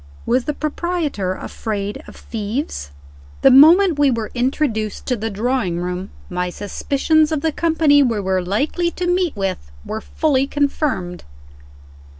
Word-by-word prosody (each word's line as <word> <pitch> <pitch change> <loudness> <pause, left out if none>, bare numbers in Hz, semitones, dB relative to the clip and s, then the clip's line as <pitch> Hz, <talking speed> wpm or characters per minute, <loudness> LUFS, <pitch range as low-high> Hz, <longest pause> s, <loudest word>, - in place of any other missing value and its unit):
Was 250 +1 +1
the 300 - -2
proprietor 305 - -2
afraid 205 -1 -4
of - - -12
thieves? 215 - -4
III. 70 0 -22
THE 270 - +7
moment 320 +5 +7
we 285 -1 +5
were 230 -4 -2
introduced 240 -4 -1
to 250 - 0
the 225 0 -3
drawing 220 -4 -1
room, 180 +2 -4 0.2
my 180 0 -2
suspicions 285 - 0
of 310 -3 -1
the 320 - +1
company 315 -2 +3
we 235 -6 +1
were 190 -1 0
likely 285 - 0
to 360 +1 -4
meet 355 -2 +1
with 190 - -3 0.2
were 220 - -4
fully 275 -1 0
confirmed. 280 - -1
250 Hz, 150 wpm, -20 LUFS, 195-300 Hz, 0.2 s, THE